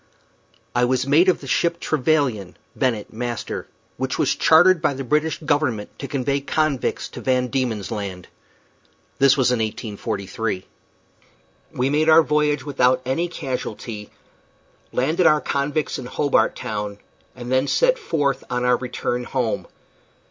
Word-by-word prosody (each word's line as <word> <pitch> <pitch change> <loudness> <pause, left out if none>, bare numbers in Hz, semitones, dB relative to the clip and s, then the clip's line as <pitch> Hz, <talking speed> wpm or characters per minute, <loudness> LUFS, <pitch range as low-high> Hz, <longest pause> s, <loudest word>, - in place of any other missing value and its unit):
I 125 - +2
was 130 +1 +1
mate 155 +7 +5
of 180 - +1
the - - -9
ship 170 +5 +1
Trevelyan 140 - 0 0.2
(Bennet, 115 -6 -1
master), 120 +1 -4 0.3
which - - -2
was - - +2
chartered 175 +2 +5
by 150 -4 +1
the 135 - -4
British 150 +5 +1
Government 145 -9 -1
to 140 - -5
convey 140 +1 -1
convicts 145 -1 -1
to - - -9
Van 125 -1 +1
Dieman's 120 -7 -2
Land. 95 -4 -5 0.9
This 135 0 +5
was 130 -2 +3
in 125 - +1
1843. 105 -2 -3 1.1
We 125 +2 0
made 155 +2 +2
our 160 +1 +7
voyage 150 -1 +1
without 130 -3 +2
any 135 +7 0
casualty, 115 -8 -5 0.8
landed 160 +7 +2
our 150 0 +5
convicts 145 +2 -1
in 125 - -7
Hobart 145 +2 +1
Town, 105 -1 -4 0.4
and 120 0 -7
then 130 +2 +2
set - - +3
forth 145 - -1
on 125 0 -1
our 125 0 +4
return 125 0 -3
home. 125 -4 -2
130 Hz, 140 wpm, -22 LUFS, 120-150 Hz, 1.1 s, our